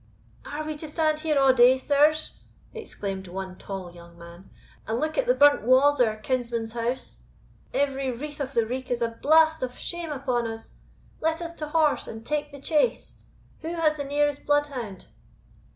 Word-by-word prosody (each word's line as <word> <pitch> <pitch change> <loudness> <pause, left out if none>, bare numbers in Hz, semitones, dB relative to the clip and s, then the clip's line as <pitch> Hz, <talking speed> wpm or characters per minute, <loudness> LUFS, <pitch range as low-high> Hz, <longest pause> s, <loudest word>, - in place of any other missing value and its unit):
"Are 300 +1 -4
we 310 0 -4
to 315 - -7
stand 310 0 0
here 310 -2 0
a' 270 -1 +6
day, 255 +1 +6
sirs," 300 +3 +2 0.3
exclaimed 200 - -6
one 190 +1 -6
tall 190 -2 -7
young 170 0 -15
man, 170 +2 -13 0.4
"and 225 +2 -1
look 310 +1 -1
at - - 0
the - - +4
burnt 290 0 +6
wa's 265 +5 +4
of 245 - +5
our 215 - -2
kinsman's 235 -1 -2
house? 240 +2 -3 0.5
Every 275 -1 0
wreath 290 +5 -6
of 275 -1 -4
the 230 -1 +3
reek 255 +3 -5
is 240 -1 0
a 230 - +1
blast 315 +1 +5
of 250 -1 -4
shame 345 -2 -5
upon 255 -4 -1
us! 225 0 -8 0.4
Let 320 +1 0
us 335 -1 -6
to 305 -2 -6
horse, 305 -1 +2
and 225 0 -8
take 295 -1 -2
the 280 - -10
chase. 310 - 0 0.4
Who 330 +2 -5
has 310 -2 +2
the 285 - -3
nearest 290 0 0
bloodhound?" 280 -9 -1
275 Hz, 185 wpm, -26 LUFS, 230-305 Hz, 0.5 s, a